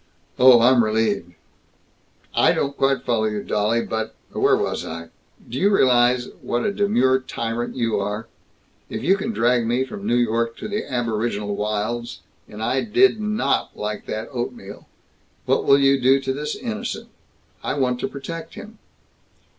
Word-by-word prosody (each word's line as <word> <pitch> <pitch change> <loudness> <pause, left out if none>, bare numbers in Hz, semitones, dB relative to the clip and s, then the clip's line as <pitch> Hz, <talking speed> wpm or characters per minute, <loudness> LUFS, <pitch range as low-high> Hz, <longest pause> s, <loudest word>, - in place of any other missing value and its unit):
"Oh! 125 -2 +8
I'm 120 0 +5
relieved." 110 -5 0 1.0
"I - - +4
don't 140 0 -1
quite 135 0 +1
follow 115 -3 +1
you, 105 -1 -2
dolly, 105 +3 0
but 110 0 -4 0.2
Where - - +3
was - - -2
I? 85 0 -7 0.4
Do 125 - -4
you 200 - +4
realize 125 -8 +3
what 120 - -2
a 205 - 0
demure 130 -11 +2
tyrant 120 -2 -4
you 115 -4 0
are? 105 +2 -3 0.6
If - - -5
you 190 - +4
can 210 +3 -3
drag 120 - +2
me 125 +3 +1
from 200 +8 -7
New 120 - +2
York 115 -1 0
to 215 - -6
the 210 -4 -4
aboriginal 110 -4 -1
wilds, 110 +3 -3 0.3
and 105 +1 -7
I 130 +4 +1
did 365 - +3
not 215 0 -1
like 105 0 -4
that 110 +1 -4
oatmeal, 120 -5 -6 0.6
what - - +1
will 140 - +6
you 135 -1 +3
do 135 +2 +5
to 135 0 -2
this 150 +2 -4
innocent? 230 -1 -5 0.5
I - - -2
want 125 -3 0
to - - -1
protect 165 +4 -7
him!" 215 0 -11
120 Hz, 160 wpm, -22 LUFS, 110-140 Hz, 1.0 s, Oh